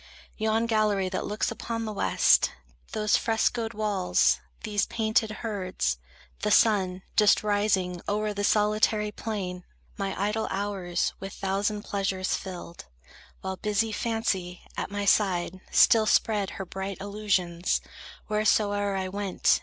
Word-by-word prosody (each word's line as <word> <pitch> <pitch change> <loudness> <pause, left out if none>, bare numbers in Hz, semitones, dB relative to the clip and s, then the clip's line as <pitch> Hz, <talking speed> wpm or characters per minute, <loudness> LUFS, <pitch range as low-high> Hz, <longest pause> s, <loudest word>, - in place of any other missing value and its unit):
Yon 220 +1 +1
gallery 210 -4 +1
that 185 - -3
looks 210 +2 -1
upon 230 0 -4
the 215 - -4
west; 200 - +3 0.4
Those 210 -1 +2
frescoed 225 0 0
walls, 205 -4 +2 0.2
these 210 -2 0
painted 220 -1 +1
herds, 195 - -2 0.4
the - - 0
sun 190 -4 +3
Just 210 -1 +5
rising 200 -4 +1
o'er 210 +1 0
the 205 0 -3
solitary 210 0 +2
plain, 190 -5 -4 0.4
My 195 -1 -2
idle 210 +2 0
hours 190 -3 -1
with 195 0 -7
thousand 200 +2 -1
pleasures 195 -3 -1
filled, 175 -2 -6 0.6
While 190 0 -4
busy 210 +2 0
Fancy, 205 -6 -2
at - - -3
my 205 0 -3
side, 185 -3 +2
still 220 -1 +5
spread 210 -3 +2
Her 190 - -4
bright 190 +1 -5
illusions, 190 -4 0 0.5
wheresoe'er 205 -1 +1
I 190 -1 -2
went. 195 0 +1
205 Hz, 130 wpm, -27 LUFS, 190-215 Hz, 0.6 s, Just